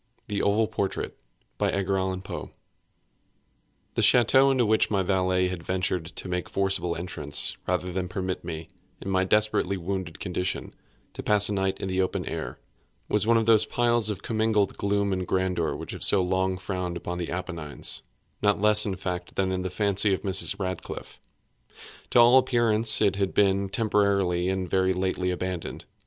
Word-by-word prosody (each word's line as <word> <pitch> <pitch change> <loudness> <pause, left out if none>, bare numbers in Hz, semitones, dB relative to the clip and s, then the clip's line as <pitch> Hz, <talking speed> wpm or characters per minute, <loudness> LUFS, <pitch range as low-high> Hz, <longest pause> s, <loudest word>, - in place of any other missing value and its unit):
THE 100 -1 -1
OVAL 110 +2 +2
PORTRAIT 100 -3 -3 0.4
The 95 -1 -2 1.5
ch├óteau 130 +3 +5
into 130 -3 +2
which 110 +1 +2
my 100 -3 +1
valet 90 -1 +1
had 90 -2 -5
ventured 90 -1 -2
to 90 - -4
make 90 -1 -3
forcible 95 -3 +1
entrance, 85 -4 -2
rather 90 0 -1
than 90 0 -2
permit 95 0 -4
me, 80 0 -6 0.3
in 95 - -5
my 95 0 +2
desperately 105 -1 +1
wounded 90 -2 -5
condition, 90 -1 -3 0.4
to - - -6
pass 105 -1 +4
a - - -1
night 95 -1 -1
in - - -4
the 95 0 0
open 95 - -2
air, - - -5 0.5
was 105 +1 +1
one 115 0 +5
of 115 - +1
those 110 -1 +4
piles 120 -2 +2
of 100 -2 -5
commingled 110 -3 0
gloom 100 0 0
and 90 -1 -3
grandeur 90 -4 0
which - - -7
have - - -4
so 95 -2 +4
long 95 +1 0
frowned 90 -2 -4
among 90 0 -4
the 85 - -4
Appennines, 85 -5 -4 0.4
not 105 0 +2
less 105 +1 +4
in 95 - -2
fact 90 -1 -5
than 95 -1 0
in 95 0 -2
the 95 - -3
fancy 100 +1 +3
of - - -10
Mrs. 95 0 +1
Radcliffe. 95 -2 -6 0.9
To - - +4
all 120 +2 +7
appearance 115 -4 +4
it 100 -2 +2
had 100 -1 -1
been 100 -1 +2
temporarily 100 -4 +1
and 95 -1 -2
very 95 +1 +1
lately 95 0 -1
abandoned. 90 -1 -4
95 Hz, 165 wpm, -26 LUFS, 90-105 Hz, 1.5 s, all